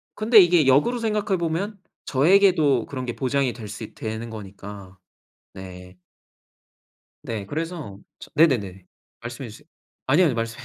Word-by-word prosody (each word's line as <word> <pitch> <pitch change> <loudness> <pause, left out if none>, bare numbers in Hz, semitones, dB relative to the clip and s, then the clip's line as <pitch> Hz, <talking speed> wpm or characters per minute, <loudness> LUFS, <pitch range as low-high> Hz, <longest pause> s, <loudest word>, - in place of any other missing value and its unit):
근데 215 0 +6
이게 175 -5 +5
역으로 145 - +3
생각해 210 -3 0
보면 175 +5 -3 0.3
저에게도 155 - +3
그런 130 -2 -6
게 120 - -4
보장이 135 -2 0
될 110 -3 -9
수 105 +2 -8
있 110 - -10
되는 110 +1 -5
거니까. 100 -2 -10 0.6
네. 90 -1 -11 1.3
네. 105 -4 -5
그래서 155 - -5 0.2
저 - - -12
네네네. 105 - +2 0.4
말씀해 120 +2 -7
주세요. 115 +8 -14 0.4
아니요, 150 +7 +4
아니요. 140 - +1
말씀해 115 +1 -4
130 Hz, 305 characters per minute, -23 LUFS, 110-165 Hz, 1.3 s, 근데